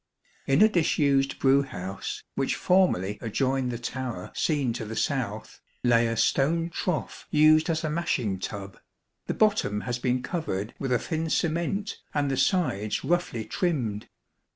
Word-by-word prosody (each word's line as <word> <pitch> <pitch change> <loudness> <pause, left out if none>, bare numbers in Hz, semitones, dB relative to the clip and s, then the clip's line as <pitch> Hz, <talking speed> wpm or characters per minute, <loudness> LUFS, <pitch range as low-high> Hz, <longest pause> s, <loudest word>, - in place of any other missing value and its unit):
In 135 +9 +5
a - - +8
disused 145 -8 +2
brew 135 +1 +4
house, 95 -8 -6
which - - 0
formerly 105 - +2
adjoined 130 +3 0
the 120 - -3
tower 120 -5 -5
seen 145 -7 0
to 115 - -4
the 110 +1 -6
south, 115 -7 -2 0.2
lay 120 -1 +4
a 115 0 -2
stone 165 +8 +2
trough 165 -2 -3
used 155 +2 +5
as 160 0 0
a 155 - -1
mashing 125 - -1
tub. 100 -2 -6 0.5
The - - -2
bottom 205 - +2
has 125 +1 -3
been 125 0 0
covered 115 - -3
with 135 -2 -2
a 125 - +4
thin 160 +4 -3
cement 170 +6 -1 0.2
and 145 -2 +1
the - - +1
sides 130 - +1
roughly 170 -10 0
trimmed. 115 - -2
135 Hz, 150 wpm, -27 LUFS, 115-160 Hz, 0.5 s, a